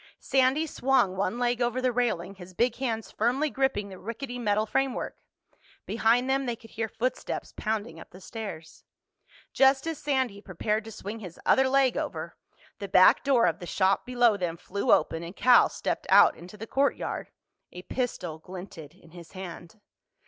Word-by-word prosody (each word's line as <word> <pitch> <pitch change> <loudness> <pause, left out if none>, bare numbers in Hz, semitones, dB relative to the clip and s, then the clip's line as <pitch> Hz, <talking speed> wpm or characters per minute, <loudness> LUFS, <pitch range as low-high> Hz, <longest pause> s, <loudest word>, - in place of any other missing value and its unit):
Sandy 270 +3 +2
swung 265 -10 +1
one 195 +4 -1
leg 245 0 0
over 240 +1 0
the 255 -1 +1
railing, 225 -7 -1
his 185 -1 -13
big 240 +2 +1
hands 230 -4 -3
firmly 260 +7 0
gripping 265 -7 0
the 190 -1 -10
rickety 245 +3 -6
metal 215 -2 +1
framework. 270 +4 -1 0.7
Behind 235 +3 +2
them 270 0 0
they 240 - -1
could 225 -1 -17
hear 225 0 -3
footsteps 240 +5 -3
pounding 210 -7 -3
up - - -12
the 185 - -14
stairs. 185 -5 -8 0.7
Just 270 +1 +4
as 325 -2 -3
Sandy 260 -8 -1
prepared 210 +3 -2
to 225 - -8
swing 210 +1 -7
his 180 -5 -10
other 265 0 +4
leg 270 -1 +3
over, - - -4 0.4
the 200 - -5
back 185 -1 +6
door 270 -4 +4
of 170 -3 0
the 175 - -8
shop 190 +2 +1
below 240 -4 +3
them 175 -3 -3
flew 200 +3 -2
open 165 - +3
and 170 +3 -8
Cal 245 -1 +6
stepped - - -3
out - - +7
into 180 +5 -12
the 220 - -7
courtyard. 275 +5 -1 0.4
A 180 - -9
pistol 180 -12 -3
glinted 175 -3 -10
in 170 -3 -20
his 170 -1 -13
hand. 185 +1 -9
220 Hz, 175 wpm, -27 LUFS, 185-255 Hz, 0.7 s, out